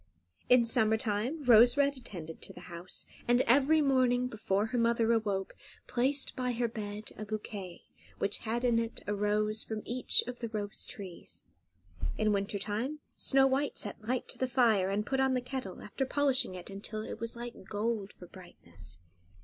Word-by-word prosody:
In 245 -1 +6
summer 220 -1 +4
time 230 +7 -1
Rose 240 +1 +7
Red 280 0 +3
attended 175 -11 -8
to - - -5
the 180 - -11
house, 170 +2 -4 0.2
and 245 +1 +5
every 285 +6 +4
morning, 255 -3 +3
before 215 -4 0
her 245 +3 -2
mother 230 0 +3
awoke, 205 -4 -1 0.3
placed 265 +3 +1
by 250 -1 -1
her 240 0 0
bed 210 -1 -6
a - - -5
bouquet 205 -3 -6 0.3
which 200 +1 +1
had 235 +2 -2
in 240 -2 +3
it 230 0 -3
a 205 - -1
rose 210 +1 +1
from 220 -1 -5
each 250 +1 +2
of 250 0 -6
the 230 - -4
rose 210 -2 -3
trees. 190 -4 -9 0.7
In 215 -1 +2
winter 200 +1 -1
time 220 +9 -3 0.2
Snow 270 -1 +4
White 270 +2 +1
set 210 +1 -2
light 250 +1 -1
to - - -5
the 260 - +1
fire, 230 -7 +3
and 205 +2 0
put 265 +4 -1
on 265 -1 +3
the - - +2
kettle, 250 -6 -6
after 210 +6 -3
polishing 275 -9 +1
it 180 +2 -8
until 210 +2 -5
it 220 - -6
was 230 +1 -3
like 235 -4 -8
gold 210 -1 -1
for 180 - -12
brightness. 85 - -11
225 Hz, 180 wpm, -31 LUFS, 205-250 Hz, 0.7 s, Rose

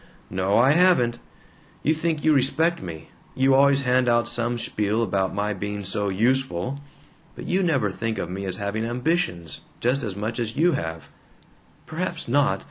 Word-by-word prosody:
"No, 95 +2 +1
I 125 +4 +5
haven't. 155 -9 +3 0.6
You 155 - +3
think 160 -1 -2
you 155 - +4
respect 155 +5 +2
me 80 -2 -8 0.3
you 135 +1 +3
always 140 +1 +5
hand 125 -1 +2
out 120 -1 +2
some 120 0 -1
spiel 105 0 -1
about 95 -3 0
my 105 +1 -1
being 100 +1 -5
so 100 +2 -1
'useful.' 125 +2 0 0.6
But - - -8
you 185 +2 +1
never 140 - +1
think 115 +3 -3
of - - -3
me 95 +3 -5
as 95 -1 -2
having 100 +2 -2
ambitions, 125 - -2 0.2
just 130 +4 +1
as 105 -7 -4
much 110 +4 -3
as 115 -1 -3
you 170 +4 +4
have 80 - -4 0.4
" - - -32
"Perhaps 170 +1 -4
not. 120 -6 +2
120 Hz, 175 wpm, -24 LUFS, 100-140 Hz, 0.6 s, I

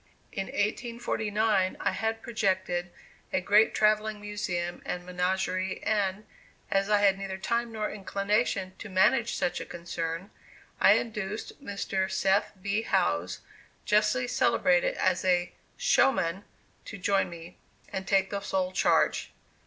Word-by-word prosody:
In 195 -1 -3
1849 215 -2 0
I - - +1
had 225 0 -2
projected 190 -6 -1 0.4
a - - +2
great 205 +4 +4
travelling 215 0 +2
museum 195 -4 -3
and 180 0 -4
menagerie, 185 +1 -1
and, 205 -1 0 0.5
as 195 +1 +2
I 210 -1 +4
had 195 -1 +4
neither 195 -1 -4
time 235 +4 -1
nor 215 -1 -2
inclination 200 -1 -1
to 215 - -8
manage 205 +6 +3
such 175 - -1
a - - -5
concern, 170 +1 -5 0.5
I - - +7
induced 215 +3 -3
Mr. 195 -4 -2
Seth 190 +1 +2
B. 200 +3 -1
Howes, 85 - 0 0.4
justly 215 +4 +2
celebrated - - +2
as 185 - +1
a 180 -1 +1 0.2
"showman," 190 -7 +2 0.4
to 210 - -7
join 195 0 +1
me, 170 +1 -11 0.3
and 190 0 -4
take 195 -1 +2
the 200 - -1
sole 190 -2 -1
charge. 185 - +2
195 Hz, 130 wpm, -28 LUFS, 185-215 Hz, 0.5 s, I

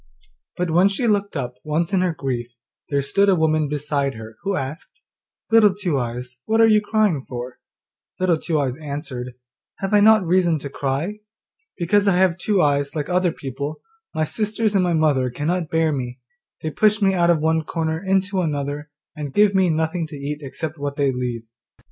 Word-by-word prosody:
But 180 -2 -1
when 180 +4 +5
she 200 +5 -2
looked 205 -5 +1
up 125 -2 -4
once 160 +4 -1
in 190 - +3
her 180 -1 +1
grief 120 -4 -4 0.3
there 140 -1 +1
stood 200 +8 +2
a 190 - +5
woman 155 -2 +2
beside 145 -1 -1
her 110 0 -10
who 195 0 -1
asked, 145 - -6 0.5
'Little 215 -4 +6
Two 180 -9 -1
eyes, 125 +1 -5
what 225 +1 +1
are 225 - +7
you 215 -1 +5
crying 210 -9 +1
for?' 125 0 -6 0.6
Little 180 -3 +2
Two 160 -1 -1
eyes 130 -3 -1
answered, 140 -5 -6 0.4
'Have 195 +1 -3
I 210 - +7
not 215 -1 +6
reason 175 -1 +3
to 140 -1 -7
cry? 145 +11 -2 0.6
Because 200 +4 +2
I 195 - +4
have 185 -1 +2
two 200 0 +2
eyes 140 0 +1
like 150 +1 -3
other 180 -1 +2
people, 140 +1 -5 0.4
my 155 - +1
sisters 215 +5 -1
and 195 -2 +3
my 175 -1 +1
mother 145 -5 +2
cannot 160 +6 -2
bear 160 -1 +2
me; 125 -3 -4 0.4
they 155 - -2
push 215 +5 +3
me 195 -2 +3
out 175 -2 +2
of 170 - +5
one 160 +1 +1
corner 160 +1 -2
into 190 0 +1
another, 145 -2 -3 0.3
and 145 -3 -6
give 205 -1 +5
me 190 -2 +3
nothing 160 +1 -1
to 155 - -9
eat 145 +1 -4
except 155 +3 -5
what 140 0 -3
they 140 -2 +2
leave. 125 -2 -3
160 Hz, 190 wpm, -22 LUFS, 140-190 Hz, 0.6 s, are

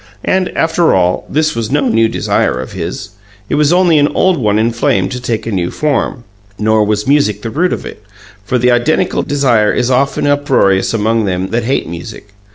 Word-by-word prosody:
And, 185 -1 +1
after 165 - +2
all, 90 -1 0
this 155 +1 0
was 115 -2 -3
no 140 0 +1
new 115 0 +3
desire 65 - 0
of 65 - -6
his; - - -6 0.4
it - - -2
was 150 +1 +2
only 175 -3 +4
an 145 - +3
old 185 -2 +2
one 105 -3 +1
inflamed 110 -4 0
to 125 - -4
take 115 -2 -3
a 115 - -3
new 90 -3 -1
form. 140 -4 -2 0.3
Nor 110 0 +2
was 105 0 -1
music 135 -8 +1
the 115 - -4
root 180 +7 0
of - - -4
it, - - -9 0.4
for 125 +5 -1
the 125 +1 +2
identical 155 +9 +1
desire 125 -7 +1
is 125 +1 0
often 135 +3 +1
uproarious 135 -10 +2
among 115 0 0
them 95 0 -2
that 115 0 -1
hate 135 +3 -1
music. 85 +5 -9
120 Hz, 195 wpm, -14 LUFS, 105-145 Hz, 0.4 s, only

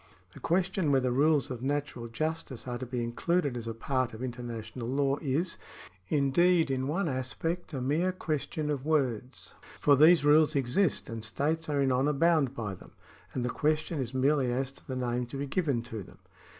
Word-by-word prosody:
The - - -11
question 180 -2 +1
whether 130 -2 +2
rules 145 +2 +3
of 125 -2 -5
natural 140 -3 -2
justice 150 +1 -4
are 120 -1 -3
to 130 - -5
be 125 -1 -2
in 115 - -3
cluded 170 0 0
as 115 -1 -5
a 115 - -2
part 130 0 -1
of 115 - -7
international 120 -1 -5
law 140 +2 +1
is, 160 +4 -1 0.5
indeed, 160 +3 +3
in 130 0 -1
one 170 +6 0
aspect, 155 +7 -3
a 135 -4 -3
mere 155 +8 +1
question 155 -3 -2
of 140 -3 -2
words. 130 -5 -1 0.3
For 145 - +5
these 155 +2 +6
rules 150 +1 +5
exist, 140 +6 +1
and 115 -1 -6
states 155 +8 -1
are 145 -2 +2
in 135 - +2
honour 135 +4 +2
bound 150 -3 +2
by 110 -5 -3
them, 95 - -14 0.4
and 125 - -1
the - - 0
question 155 +1 0
is 130 - -2
merely 135 -1 +2
as 130 +2 -1
to 135 - -17
the 130 - -4
name 125 -1 -1
to 135 - -7
be 140 - -2
given 140 -6 0
to 115 -3 -6
them. - - -13
135 Hz, 195 wpm, -30 LUFS, 125-155 Hz, 0.5 s, these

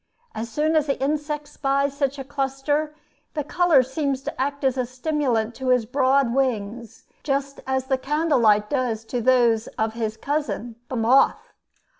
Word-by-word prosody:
As 225 +2 -5
soon 305 +6 0
as 305 -1 +2
the 275 - -1
insect 295 +1 -2
spies 275 -1 0
such 280 -1 -1
a 270 - -5
cluster, 285 +2 -2 0.4
the 300 - -1
color 330 -3 +4
seems 270 0 -2
to - - -4
act 280 +1 -2
as 265 -1 +2
a 255 -2 -1
stimulant 255 -4 -1
to 265 - -5
his 250 -3 +3
broad 260 0 +2
wings, 235 -4 -2 0.2
just 275 -1 -2
as 265 0 0
the 265 0 0
candle 300 +1 +1
light 210 -2 +4
does 240 -5 -1
to 245 +1 -3
those 235 -2 +3
of 220 0 0
his 220 -1 -3
cousin 275 -3 -3
the 260 - -3
moth. 245 +4 +3
265 Hz, 170 wpm, -23 LUFS, 240-285 Hz, 0.4 s, color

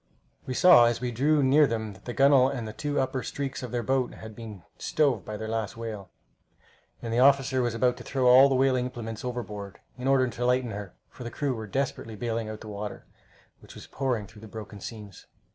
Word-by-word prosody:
We 130 - -3
saw 175 -9 +8
as 120 0 +1
we 125 0 -2
drew 145 +5 +2
near 140 +3 +5
them 110 -3 -3
that - - -18
the 120 - -4
gunwale 135 -1 +5
and 125 -5 -4
the 110 - -7
two 145 +4 -2
upper 130 0 -1
streaks 135 +1 -4
of 125 - -5
their 120 -1 -2
boat 130 0 0
had 110 -1 -10
been 105 -6 -9 0.2
stove 135 - +1
by 105 - -6
their 110 - -5
last 110 -1 -3
whale, 110 -5 -6 0.9
and 115 -1 -3
the 120 - +2
officer 135 -1 +4
was 120 -2 -1
about 125 +1 +1
to - - -10
throw 130 -2 -1
all 130 +3 +8
the 135 - +1
whaling 130 -1 +2
implements 115 -3 -6
overboard, 105 -6 -5 0.2
in 125 - -3
order 135 -1 +4
to 120 0 -5
lighten 125 -1 +1
her, 100 -1 -7
for 125 - -11
the 120 - -5
crew 140 +1 -2
were 110 -2 -6
desperately 125 -2 -3
bailing 115 0 -3
out 110 0 -7
the 110 - -9
water, 105 0 -6 0.5
which - - -15
was - - -10
pouring 130 -5 -2
in - - -12
through 105 0 -16
the 110 - -10
broken 105 -1 -9
seams. 105 -2 -10
120 Hz, 230 wpm, -27 LUFS, 110-130 Hz, 0.9 s, saw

